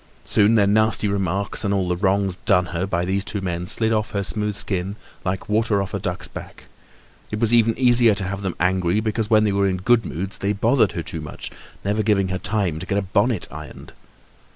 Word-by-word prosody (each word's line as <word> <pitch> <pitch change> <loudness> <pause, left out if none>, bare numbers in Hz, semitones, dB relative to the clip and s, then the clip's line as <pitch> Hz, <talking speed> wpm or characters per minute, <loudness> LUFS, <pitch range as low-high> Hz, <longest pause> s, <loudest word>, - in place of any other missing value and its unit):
Soon 105 +2 +3
their 105 -3 +4
nasty 110 +1 +2
remarks 100 +1 -1
and 100 - 0
all 95 -2 0
the 90 - 0
wrongs 95 0 0
done 90 -3 +4
her 90 +3 -1
by 90 -2 -1
these 95 +2 0
two 100 - -4
men 90 -2 -3
slid 110 +2 0
off 110 -1 0
her 100 -1 -1
smooth 105 +1 -2
skin 95 -1 -2 0.3
like 95 0 -3
water 105 -1 +1
off 100 +1 -4
a 100 - -1
duck's 90 -2 -4
back. - - -10 0.7
It 105 - -4
was 115 0 +3
even 115 -1 +4
easier 120 -3 +5
to 100 - -2
have 95 +1 -4
them 95 -3 -3
angry, 90 +2 +1
because 110 0 -2
when 110 -2 +5
they 105 - +2
were 100 0 +2
in 95 - -1
good 115 +5 +3
moods 95 +3 -5
they 100 +1 0
bothered 110 +1 +2
her 85 - -3
too 80 - -5
much, 75 - -7 0.3
never 105 +2 +1
giving 100 -3 +1
her 95 0 -2
time 95 -5 0
to 95 - -7
get 100 - 0
a 100 - 0
bonnet 100 +2 0
ironed. - - -10
100 Hz, 225 wpm, -22 LUFS, 95-110 Hz, 0.7 s, easier